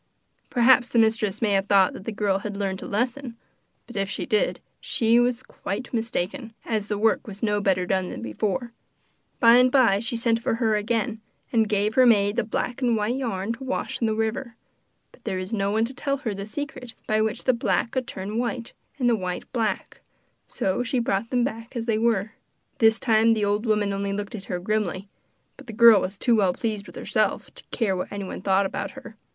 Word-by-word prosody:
Perhaps 245 0 +4
the - - -1
mistress 220 -2 +2
may 210 - +2
have 195 0 +1
thought 195 -2 +4
that 190 - -10
the 225 - -3
girl 200 -2 0
had 205 0 -5
learnt 195 -2 -2
a - - -6
lesson, 245 +3 -2 0.5
but, 240 - -13
if 195 -1 -1
she - - -3
did, 215 -5 +1 0.2
she 230 +1 +2
was 245 0 +1
quite 225 +6 -6
mistaken, 225 +1 -3
as 215 -3 -2
the 210 - -2
work 220 +2 +1
was 205 0 -9
no 210 -1 +1
better 185 -2 +1
done 185 0 0
than 105 - -7
before. 205 - -2 0.7
By 235 0 +7
and 250 0 +5
by 240 -8 +4
she 230 +2 -1
sent 230 0 +1
for 225 - 0
her 225 -2 +1
again, 220 +1 -1 0.3
and 220 -2 +3
gave 210 +1 +1
her 255 0 +5
maid 205 -2 +4
the 240 - +1
black 240 +3 -3
and 240 -3 +2
white 215 +3 0
yarn 225 -5 -2
to 250 +3 -9
wash 260 -1 -3
in 230 - +2
the 215 - 0
river; 225 +2 -2 0.6
but - - -22
there 190 - -2
was 185 +4 -5
no 200 -2 0
one 220 +2 +1
to 250 - -6
tell 275 +2 -2
her 235 -7 -3
the 200 +1 -6
secret 250 -1 -6
by 215 0 +1
which 220 +2 -1
the 255 - +3
black 235 0 0
would 260 -2 -2
turn 200 +4 -4
white, 240 -1 -3 0.2
and 250 -3 +1
the 235 - +4
white 180 -3 -5
black; 220 -5 -2 0.5
so 190 +5 -1
she 250 +1 -1
brought 230 -2 0
them 245 -2 +1
back 230 -1 -5
as 230 -1 -3
they 220 -2 +1
were. 220 -3 +1 0.5
This 225 -1 +4
time 225 -1 +4
the 210 -2 0
old 205 +3 0
woman 210 -2 +1
only 200 0 -2
looked 205 +2 -4
at 200 -3 -7
her 180 - -3
grimly 200 0 -2 0.5
but - - -14
the 225 - -7
girl 230 -2 +7
was 195 +2 -4
too 240 +2 +3
well 195 -4 +3
pleased 215 -2 -3
with - - -13
herself - - -1
to - - -14
care 205 -5 0
what 180 - -4
anyone 200 -2 -5
thought 195 +1 +2
about - - -3
her. 230 -4 -10
220 Hz, 220 wpm, -25 LUFS, 200-235 Hz, 0.7 s, By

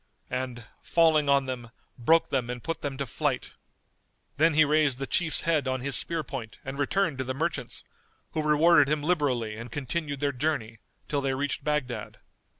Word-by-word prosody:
—and, 125 -2 -4 0.2
falling 160 -3 +3
on 140 -1 +4
them 125 -3 -5 0.3
broke 160 +7 +3
them 125 -3 -1
and 125 -1 -5
put 165 0 -3
them 140 -2 -4
to 140 - -2
flight. 120 - -2 0.9
Then 160 +1 +4
he 155 0 +6
raised 150 -3 +2
the 135 - -3
Chief's 165 +2 +1
head 155 -5 +1
on 130 -1 -1
his 135 0 +3
spear 165 +5 +3
point 120 -7 -7
and 135 +1 -6
returned 155 -1 0
to - - 0
the 130 0 -4
merchants, 165 +5 -3 0.5
who 155 - -1
rewarded 150 0 +5
him 150 -1 0
liberally 135 -10 0
and 115 +1 -8
continued 145 +1 -3
their 145 0 +1
journey, 125 -5 -2 0.3
till 145 -1 -1
they 135 -1 0
reached 140 +1 -2
Baghdad. 130 -8 -2
140 Hz, 180 wpm, -27 LUFS, 130-155 Hz, 0.9 s, he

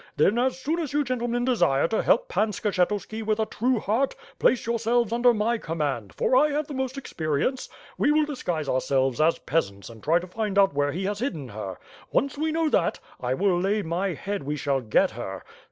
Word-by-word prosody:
Then, 200 +10 +3
as 260 +1 0
soon 310 +6 -1
as 305 -5 -3
you 295 0 +2
gentlemen 245 -2 -1
desire 165 - +3
to 220 - +1
help - - +3
Pan 340 - +1
Skshetuski 210 +2 -1
with 215 0 0
a 220 - +2
true 240 +4 0
heart, 230 +7 0 0.2
place 260 - +3
yourselves 230 0 +1
under 240 +1 +5
my 230 +1 0
command; 145 - -3
for - - +2
I 295 +4 +5
have 295 +1 -1
the 290 - -8
most 265 0 -3
experience. 165 - -2 0.3
We 290 - +3
will 305 0 +3
disguise 175 - -3
ourselves 130 0 +1
as 165 +2 +3
peasants 100 -10 -2
and 110 -1 -13
try 160 +3 +3
to 175 - -3
find 205 +1 -3
out 195 -5 +5
where 145 0 +1
he 180 +6 -3
has 205 +1 -2
hidden 165 - -3
her. 100 -3 -6 0.3
Once 275 0 +1
we 315 +2 -1
know 325 0 +1
that, 170 - +1 0.2
I 125 +1 -1
will 185 +1 +2
lay 200 +3 +1
my 175 +3 -1
head 200 +6 -4
we 145 +2 -3
shall 140 -2 0
get 110 -2 +2
her. 105 -5 -6
205 Hz, 210 wpm, -26 LUFS, 150-255 Hz, 0.3 s, under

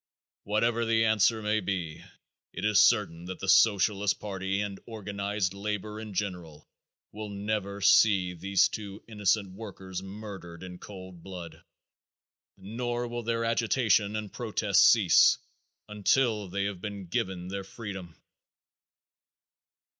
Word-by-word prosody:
Whatever 115 +3 +1
the 115 0 +2
answer 110 +1 +3
may 105 +1 +1
be, 90 -5 -4 0.5
it - - -4
is 105 -2 +5
certain 85 +1 +3
that 90 0 -6
the 95 - -5
Socialist 100 -1 +4
party 95 -1 -3
and 100 -1 -3
organized 100 -3 -3
labor 105 +1 -4
in 110 -3 -8
general 90 -6 -4 0.4
will 105 0 -7
never 100 0 -3
see 100 -2 +5
these 95 +2 +2
two 100 -1 -7
innocent 105 -2 0
workers 95 -2 -7
murdered 95 -4 -9
in 90 -1 -9
cold 95 -3 -10
blood, 90 -2 -9 1.0
nor 120 +5 -3
will 120 0 -4
their 115 0 -1
agitation 115 -2 +2
and 105 -2 -5
protest 105 -3 +3
cease 105 -7 +6 0.5
until 105 +1 +1
they 100 +2 -2
have 100 -3 -4
been 100 -1 -6
given 90 +1 -3
their 100 0 -4
freedom. 95 -5 -8
100 Hz, 125 wpm, -29 LUFS, 95-110 Hz, 1.0 s, cease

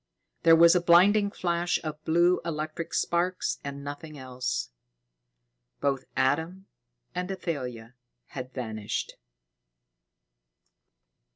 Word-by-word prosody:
There 165 -1 +7
was 170 +1 +7
a 180 - +3
blinding 195 +5 +5
flash 175 -2 0
of 155 -1 -6
blue 175 +3 +3
electric 155 0 -4
sparks 180 +2 0
and 140 0 -6
nothing 145 +2 -7
else. 125 - -3 1.1
Both 135 -2 0
Adam 160 +8 0 0.5
and 180 +1 -3
Athalia 125 -11 -5 0.4
had 130 -1 -7
vanished. 110 -5 -4
160 Hz, 95 wpm, -28 LUFS, 135-175 Hz, 1.1 s, There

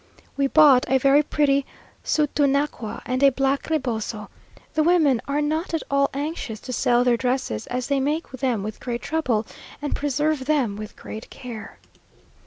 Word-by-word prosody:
We 280 -1 +1
bought 280 -3 +6
a 265 - +4
very 275 +2 +5
pretty 280 -2 +1 0.4
sutunacua, 285 -5 0
and 255 +1 -1
a 280 - +7
black 270 +2 -1
reboso. 230 -8 -2 0.4
The 310 - +2
women 310 -7 +3
were 290 +1 0
not 315 +3 -1
at 320 - -2
all 280 0 +3
anxious 280 -7 -4
to 255 - -6
sell 245 0 +3
their 245 -1 +3
dresses, 250 - -2
as 250 0 -2
they 280 0 +1
make 300 +5 -1
them 255 -5 -1
with 215 +1 -6
great 240 -1 -4
trouble, 255 -9 0 0.3
and 290 -1 -3
preserve 290 0 0
them 270 -8 +1
with 210 0 -8
great 220 - -9
care. 235 -4 -9
275 Hz, 165 wpm, -23 LUFS, 245-295 Hz, 0.4 s, a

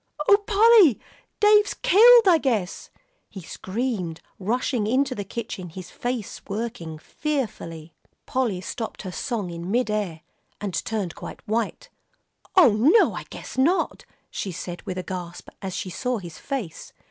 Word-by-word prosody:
"Oh, 405 - +8
Polly, 425 - +6 0.4
Dave's 420 -1 +5
killed, 460 +3 +7
I 340 -3 +6
guess," 220 -10 -2 0.4
he 190 - -9
screamed, 190 -3 -3 0.2
rushing 230 +2 -1
into 260 +3 +1
the 205 - -4
kitchen, 195 -3 -6
his 180 +2 -10
face 245 -4 -4
working 200 -7 -4
fearfully. 170 - -4 0.3
Polly 235 -8 -1
stopped 220 +3 -6
her 185 - -5
song 210 -3 -3
in 170 +1 -6
mid 235 +1 +1
air, 195 -7 -2 0.4
and 200 -3 -4
turned 195 -2 -2
quite - - -10
white. 220 0 -2 0.6
"Oh, 360 - +8
no, 285 - +5
I - - -6
guess - - -7
not," 335 +8 +1 0.3
she 195 - -4
said 175 +1 -6
with 185 - -3
a 185 - -3
gasp, 175 -2 -7
as 190 -2 -4
she 185 - -4
saw 250 +6 -2
his 175 -6 -9
face. 255 - -5
215 Hz, 145 wpm, -24 LUFS, 185-265 Hz, 0.6 s, Oh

